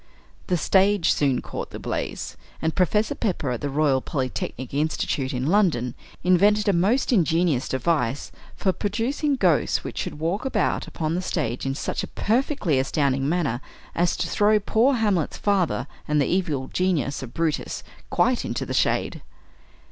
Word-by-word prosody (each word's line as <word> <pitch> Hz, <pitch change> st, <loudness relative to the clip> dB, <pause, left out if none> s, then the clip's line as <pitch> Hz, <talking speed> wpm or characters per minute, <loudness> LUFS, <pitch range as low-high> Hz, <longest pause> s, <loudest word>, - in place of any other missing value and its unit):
The 180 Hz, -, +1 dB
stage 195 Hz, +1 st, +3 dB
soon 135 Hz, -4 st, +1 dB
caught -, -, -6 dB
the -, -, -7 dB
blaze; -, -, -4 dB, 0.2 s
and 160 Hz, 0 st, -1 dB
Professor 210 Hz, +4 st, +2 dB
Pepper, 175 Hz, -, -2 dB
at 120 Hz, -, -3 dB
the 145 Hz, -, -2 dB
Royal 140 Hz, -2 st, +2 dB
Polytechnic 130 Hz, -2 st, -4 dB
Institute, 145 Hz, -2 st, -1 dB
in 125 Hz, -1 st, -2 dB
London, 160 Hz, -, +2 dB, 0.3 s
invented 205 Hz, +4 st, +4 dB
a 200 Hz, -, +4 dB
most 210 Hz, +10 st, +2 dB
ingenious 165 Hz, -, +2 dB
device 130 Hz, -1 st, 0 dB, 0.2 s
for 190 Hz, -, +1 dB
producing 240 Hz, -, -1 dB
ghosts 180 Hz, -, +2 dB
which -, -, -5 dB
should -, -, -4 dB
walk 165 Hz, +6 st, -1 dB
about 265 Hz, -, 0 dB
upon 160 Hz, -1 st, -2 dB
the 180 Hz, -, -1 dB
stage 135 Hz, -9 st, -2 dB
in 135 Hz, -, -1 dB
such -, -, -2 dB
a -, -, -5 dB
perfectly 220 Hz, -, 0 dB
astounding 135 Hz, 0 st, +1 dB
manner 150 Hz, -8 st, 0 dB, 0.3 s
as 175 Hz, +1 st, +1 dB
to -, -, -1 dB
throw 210 Hz, +1 st, +3 dB
poor 235 Hz, +6 st, +2 dB
Hamlet's 205 Hz, -9 st, 0 dB
father 195 Hz, -5 st, +1 dB, 0.2 s
and 150 Hz, 0 st, +2 dB
the 140 Hz, -, +3 dB
evil 155 Hz, -7 st, -1 dB
genius 175 Hz, -7 st, 0 dB
of 125 Hz, -3 st, -9 dB
Brutus 165 Hz, -2 st, -1 dB, 0.3 s
quite -, -, +2 dB
into -, -, -3 dB
the -, -, -4 dB
"shade." -, -, 0 dB
165 Hz, 160 wpm, -24 LUFS, 140-200 Hz, 0.3 s, invented